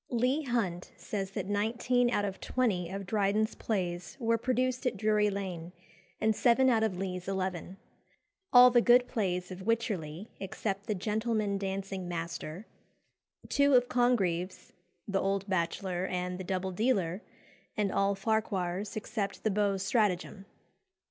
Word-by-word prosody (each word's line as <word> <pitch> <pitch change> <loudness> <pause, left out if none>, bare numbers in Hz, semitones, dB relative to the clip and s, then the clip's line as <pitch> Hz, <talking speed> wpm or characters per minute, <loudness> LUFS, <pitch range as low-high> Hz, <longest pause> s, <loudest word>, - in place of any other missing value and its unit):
Leigh 250 +5 +1
Hunt 220 - -2
says 195 -2 -4
that 195 - -4
"Nineteen 235 +5 +1
out 205 -4 +1
of 195 -1 -5
twenty 200 -9 0
of 195 +1 -5
Dryden's 210 +2 +1
plays 180 -2 -3
were 230 -2 +2
produced 255 +2 0
at 240 -4 -1
Drury 210 0 +2
Lane, 180 -4 -5 0.5
and 220 0 +2
seven 255 +3 +4
out 225 -2 +3
of 215 -5 0
Lee's 185 -1 -4
eleven; 190 -1 -3 0.7
all 250 -1 +9
the 240 -1 +5
good 245 +1 +5
plays 180 -4 -2
of 185 +1 -7
Wycherly, 200 -5 -2
except 195 +1 -4
'The 215 - 0
Gentleman 215 0 -1
Dancing 195 -1 -4
Master;' 170 +2 -5 0.8
two 280 -1 +4
of 245 0 +4
Congreve's 190 -8 0 0.3
'The 195 -2 0
Old 195 0 -1
Bachelor' 185 0 -1
and 180 0 -3
'The 185 - -5
Double 190 0 -2
Dealer;' 195 -3 0 0.6
and 205 -2 +1
all 200 0 +2
Farquhar's, 195 -2 -1
except 215 -2 -4
'The 220 - +2
Beau's 200 -1 +1
Stratagem. 195 -2 0
200 Hz, 140 wpm, -30 LUFS, 185-230 Hz, 0.8 s, all